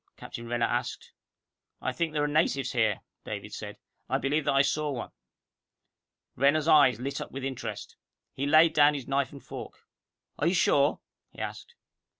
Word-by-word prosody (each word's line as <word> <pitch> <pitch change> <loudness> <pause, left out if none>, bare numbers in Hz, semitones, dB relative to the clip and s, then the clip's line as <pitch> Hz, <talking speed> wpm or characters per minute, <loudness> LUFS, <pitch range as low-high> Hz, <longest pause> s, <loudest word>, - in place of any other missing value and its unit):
Captain 120 0 -8
Renner 120 0 +1
asked. - - -3 0.7
"I 130 - -2
think 165 +4 -1
there 150 -1 0
are - - +2
natives 145 -2 +1
here," 110 -5 +1 0.2
David - - -6
said. - - -7 0.3
"I - - +2
believe 145 +2 0
that 145 - +2
I 135 - +6
saw 150 +1 0
one." 135 - -5 1.2
Renner's 145 +4 +3
eyes 145 -6 +6
lit 135 +3 -4
up - - -7
with 135 0 -6
interest. 130 -2 -5 0.4
He 140 +2 -2
laid 155 +2 +6
down 150 -1 +5
his 135 -4 -6
knife 135 -1 0
and 140 -2 -12
fork. - - -9 0.5
"Are 150 - +2
you 175 - +2
sure?" 145 -4 +3 0.3
he - - -22
asked. 475 - -6
140 Hz, 170 wpm, -28 LUFS, 130-155 Hz, 1.2 s, I